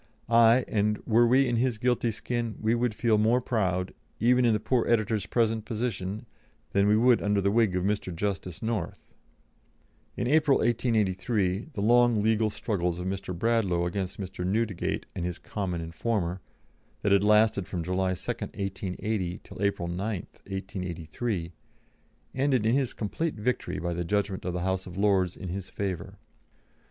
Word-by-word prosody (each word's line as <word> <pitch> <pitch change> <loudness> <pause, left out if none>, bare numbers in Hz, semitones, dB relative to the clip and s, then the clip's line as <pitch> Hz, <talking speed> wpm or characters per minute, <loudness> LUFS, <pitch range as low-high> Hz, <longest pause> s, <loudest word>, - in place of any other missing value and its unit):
Aye, 115 +2 +6
and 105 0 +1
were 120 +1 +4
we 130 +3 +4
in 120 -1 +1
his 125 -1 +1
guilty 120 +1 +1
skin, 115 0 -3
we 110 +1 +1
would 120 -2 0
feel 110 -3 +2
more 115 +4 +4
proud, 95 -7 -1 0.3
even 125 +2 +4
in 115 - +4
the 105 - +1
poor 120 +2 +1
editor's 110 -3 +1
present 115 -2 +1
position, 110 -3 -3 0.5
than 100 +1 +3
we 105 +1 +4
would 120 +1 +4
under 105 0 +1
the 100 0 +2
wig 110 -4 +3
of 90 - 0
Mr. 100 -1 -1
Justice 95 +1 -3
North." 110 -6 -4 1.0
In - - -1
April, 145 +1 +4
1883, 105 -3 0
the 105 - -3
long 120 -1 +4
legal 110 0 +2
struggles 90 -5 -2
of 90 - -5
Mr. 95 -2 -4
Bradlaugh 100 -5 +1
against 95 +2 -3
Mr. 95 -2 -5
Newdegate 105 0 -1
and 90 - -3
his 90 0 -3
common 90 -5 -4
informer, 90 +1 -2 0.6
that 100 - +2
had 100 0 +5
lasted 105 -2 +4
from 85 -2 -3
July 95 +1 0
2, - - -3
1880, 95 -1 -3
till - - -10
April 100 -4 0
9, 85 +1 -4 0.2
1883, 90 0 -5 0.8
ended 130 -4 +1
in 115 - +3
his 135 -2 +1
complete 150 +10 -2
victory 115 +4 -2
by 85 0 -2
the 85 +1 -2
judgment 100 +1 -1
of 90 - -2
the 90 - -2
House 95 +1 -1
of 90 0 -9
Lords 95 -3 +2
in 95 - -6
his 95 +1 -5
favour. 95 -4 -4
105 Hz, 165 wpm, -28 LUFS, 95-115 Hz, 1.0 s, Aye